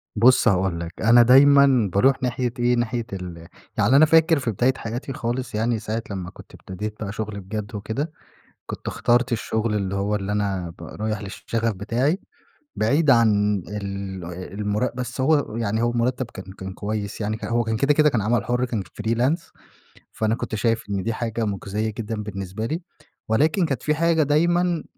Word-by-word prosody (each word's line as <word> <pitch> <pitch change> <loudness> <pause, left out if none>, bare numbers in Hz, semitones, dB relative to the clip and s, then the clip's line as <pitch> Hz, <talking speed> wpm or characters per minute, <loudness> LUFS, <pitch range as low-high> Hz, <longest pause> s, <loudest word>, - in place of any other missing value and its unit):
بُصّ 125 +3 +5
هاقول 95 -4 +2
لَك، 85 0 -7
أنا 120 +2 +7
دايمًا 135 -2 +6
باروح 130 +5 +3
ناحية 125 -1 -1
إيه، 120 0 +3
ناحية 120 0 -1
ال 85 -3 -7 0.3
يعني 130 - +4
أنا 150 +3 +8
فاكر 160 0 +4
في 125 -3 -1
بداية 125 +6 +2
حياتي 120 +4 -5
خالص، 120 -1 -3
يعني 115 +1 0
ساعة 110 +2 -3
لمّا 95 -3 -4
كُنت - - -15
ابتديت 105 +3 -6
بقى 100 - -4
شغل 105 -1 -4
بجد 105 +3 -6
وكده، 110 +10 -3 0.5
كُنت - - -8
اخترت 120 +1 +1
الشغل 110 -1 -1
اللي 100 -2 -1
هو، 100 +2 0
اللي 100 0 -3
أنا 100 -4 -1
ب - - -10
رايح 110 0 -4
للشغف 115 +3 -2
بتاعي، 120 - 0 0.6
بعيد 140 +7 +3
عن 105 -4 +4
ال 100 -3 -5 0.4
المُرَ 105 +4 0
بس 125 +1 -4
هو 145 -5 +2
يعني 110 -1 -1
هو 120 - +2
المُرتّب 120 +2 0
كان 95 0 -9
كان 95 0 -7
كويس 105 0 -4
يعني. 110 +1 -2
ه - - -3
هو 120 0 +1
كان 110 0 -1
كده، 140 +6 +3
كده 150 0 +5
كان 120 -7 0
عمل 115 +1 +1
حُر 125 +1 0
كان 115 -5 -2 0.2
Freelance 120 +10 0 0.6
فأنا 110 0 0
كُنت 115 - -4
شايف 115 +1 0
إن 100 -2 -1
دي 115 - -1
حاجة، 115 0 -2
مُجْزِية 105 +1 -2
جدًا 110 -1 -4
بالنسبة 100 0 -5
لي، 160 +8 -2 0.5
ولكن 155 - +2
كانت 135 -6 -3
في 150 - +1
حاجة 165 0 +3
دايمًا، 170 +3 +2
115 Hz, 180 wpm, -23 LUFS, 105-130 Hz, 0.6 s, أنا